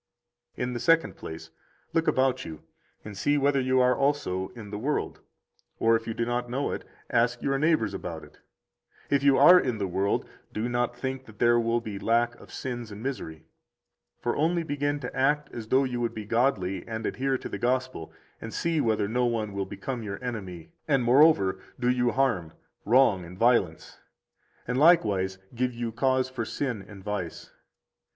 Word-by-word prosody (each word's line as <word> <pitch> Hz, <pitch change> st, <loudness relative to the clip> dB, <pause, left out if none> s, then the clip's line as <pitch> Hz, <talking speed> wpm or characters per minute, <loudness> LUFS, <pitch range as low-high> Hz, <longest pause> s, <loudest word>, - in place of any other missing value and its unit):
79 125 Hz, -, -2 dB
In -, -, -4 dB
the 120 Hz, -, -3 dB
second 165 Hz, +7 st, +3 dB
place, 80 Hz, 0 st, -9 dB, 0.4 s
look 165 Hz, 0 st, +1 dB
about 130 Hz, 0 st, +2 dB
you 80 Hz, -2 st, -9 dB, 0.4 s
and 105 Hz, -1 st, -8 dB
see 145 Hz, +9 st, +1 dB
whether 140 Hz, 0 st, +2 dB
you 130 Hz, 0 st, +2 dB
are 125 Hz, 0 st, +4 dB
also 135 Hz, -10 st, 0 dB
in 105 Hz, -4 st, -9 dB
the 105 Hz, -, -4 dB
world, 145 Hz, +6 st, -2 dB, 0.6 s
or 115 Hz, 0 st, +4 dB
if 115 Hz, 0 st, -2 dB
you 115 Hz, -, -3 dB
do 115 Hz, -, -1 dB
not 120 Hz, 0 st, -2 dB
know 135 Hz, +4 st, -1 dB
it, -, -, -4 dB, 0.3 s
ask 120 Hz, +1 st, +1 dB
your 135 Hz, 0 st, +1 dB
neighbors 150 Hz, -10 st, +2 dB
about 80 Hz, -5 st, -6 dB
it. 75 Hz, -, -16 dB, 0.7 s
If 140 Hz, -1 st, +3 dB
you 140 Hz, -1 st, +5 dB
are 180 Hz, +1 st, +9 dB
in 125 Hz, -7 st, -1 dB
the 100 Hz, -, -1 dB
world, 95 Hz, +2 st, 0 dB, 0.2 s
do 110 Hz, +3 st, -2 dB
not 120 Hz, 0 st, -1 dB
think 130 Hz, +1 st, -4 dB
that 110 Hz, -3 st, -15 dB
there 120 Hz, +1 st, +4 dB
will 115 Hz, 0 st, +1 dB
be 105 Hz, -4 st, -6 dB
lack 115 Hz, +2 st, +2 dB
of -, -, -15 dB
sins 120 Hz, -4 st, -5 dB
and 105 Hz, +2 st, -8 dB
misery. 80 Hz, -, -5 dB, 0.7 s
For 120 Hz, -, -1 dB
only 165 Hz, +3 st, +1 dB
begin 145 Hz, -1 st, -1 dB
to 125 Hz, -, -6 dB
act 145 Hz, +2 st, +1 dB
as 115 Hz, -2 st, -6 dB
though 130 Hz, +4 st, +3 dB
you 125 Hz, -2 st, -2 dB
would 115 Hz, -, -2 dB
be 110 Hz, -1 st, -5 dB
godly 105 Hz, -6 st, 0 dB
and 110 Hz, -1 st, -4 dB
adhere 135 Hz, 0 st, 0 dB
to -, -, -7 dB
the 100 Hz, -, -5 dB
Gospel, 125 Hz, -7 st, -1 dB, 0.3 s
and 115 Hz, -, -6 dB
see 165 Hz, +3 st, 0 dB
whether 110 Hz, -4 st, +1 dB
no 125 Hz, +3 st, +1 dB
one 110 Hz, -3 st, -2 dB
will 100 Hz, -1 st, -3 dB
become 110 Hz, +6 st, -5 dB
your 100 Hz, -2 st, -5 dB
enemy, 95 Hz, -9 st, -6 dB, 0.2 s
and, 135 Hz, -4 st, +2 dB
moreover, 120 Hz, -7 st, +4 dB, 0.2 s
do 125 Hz, 0 st, +2 dB
you 125 Hz, -1 st, +2 dB
harm, 115 Hz, -11 st, 0 dB, 0.3 s
wrong, 115 Hz, -5 st, +4 dB
and 90 Hz, +2 st, -11 dB
violence, 115 Hz, -8 st, +1 dB, 0.7 s
and 125 Hz, +1 st, 0 dB
likewise 100 Hz, -, +4 dB, 0.2 s
give 125 Hz, 0 st, -1 dB
you 120 Hz, -1 st, -3 dB
cause 130 Hz, +2 st, +1 dB
for 130 Hz, -3 st, -4 dB
sin 120 Hz, -2 st, -3 dB
and 100 Hz, -2 st, -12 dB
vice. 105 Hz, -4 st, -5 dB
120 Hz, 190 wpm, -27 LUFS, 105-130 Hz, 0.7 s, are